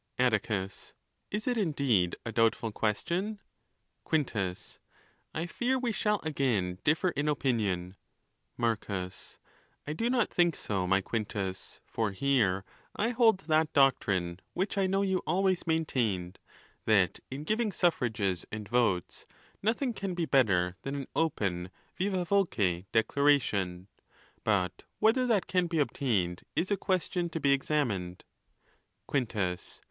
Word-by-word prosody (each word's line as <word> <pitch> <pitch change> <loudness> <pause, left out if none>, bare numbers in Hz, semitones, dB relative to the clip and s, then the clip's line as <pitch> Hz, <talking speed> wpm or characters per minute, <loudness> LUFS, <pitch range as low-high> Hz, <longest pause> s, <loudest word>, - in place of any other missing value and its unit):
Atticus.—Is 110 - -2
it 245 -2 +1
indeed 140 - +2
a 115 - -3
doubtful 115 0 +2
question? 175 - -1 0.7
Quintus.—I 120 - -4
fear 245 +9 0
we 250 -2 -1
shall 210 -1 +1
again 115 - 0
differ 160 +5 +3
in 145 -2 -2
opinion. 105 -11 0 0.3
| - - -48
Marcus.—I 100 +6 -6
do 230 +9 -1
not 245 -3 +2
think 175 -3 +3
so, 95 -3 -2
my 95 +1 +3
Quintus; 100 -3 -4
for 110 -2 -1
here 100 -5 +2 0.3
I 225 - +1
hold 230 -5 +4
that 160 -2 +2
doctrine, 95 -10 +2 0.2
which 190 +3 -1
I 195 -1 +2
know 195 +1 +1
you 190 -1 +1
always 185 -1 +1
maintained, 115 - 0 0.5
that 100 -6 +3
in 135 +3 -5
giving 215 +5 0
suffrages 115 - 0
and 105 -1 -5
votes, 115 -6 0 0.3
nothing 235 +4 0
can 195 -3 -4
be 170 -1 0
better 95 - +2
than 140 +1 -4
an 140 -2 -4
open 95 - 0 0.3
vivd 185 -1 0
voce 105 - +1
declaration. 110 -8 +2 0.6
But 90 -4 +1 0.2
whether 250 +4 +3
that 215 -6 +2
can 180 -2 +1
be 165 -1 -2
obtained 105 - 0
is 185 +4 0
a - - +4
question 180 -2 -1
to 165 - -4
be 140 -2 +4
examined. 115 -11 -1 0.8
Quintus. 105 -9 -2
135 Hz, 125 wpm, -30 LUFS, -, 0.8 s, hold